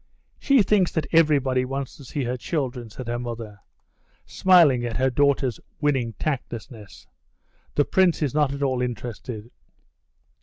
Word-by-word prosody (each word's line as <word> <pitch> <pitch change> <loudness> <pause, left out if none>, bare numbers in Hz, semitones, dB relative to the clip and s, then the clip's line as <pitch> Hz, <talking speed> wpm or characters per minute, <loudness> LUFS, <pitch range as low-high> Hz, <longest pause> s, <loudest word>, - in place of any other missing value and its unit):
"She 275 -6 +4
thinks 195 -3 +2
that 160 -3 -1
everybody 140 -6 +3
wants 135 +1 -4
to 140 - -13
see 135 +2 -4
her 125 +1 -2
children," 125 -3 -3
said 120 +3 -9
her 120 0 -2
mother, 115 -3 -7 0.7
smiling 165 -10 +4
at 115 -2 -3
her 130 +1 +2
daughter's 135 -3 +1 0.2
winning 135 -6 0
tactlessness. 115 -8 -6 0.7
"The 145 - +3
Prince 185 -4 +2
is 140 - -1
not 150 -2 +2
at 140 0 -4
all 130 -2 0
interested." 120 -1 -5
130 Hz, 145 wpm, -24 LUFS, 120-145 Hz, 0.7 s, She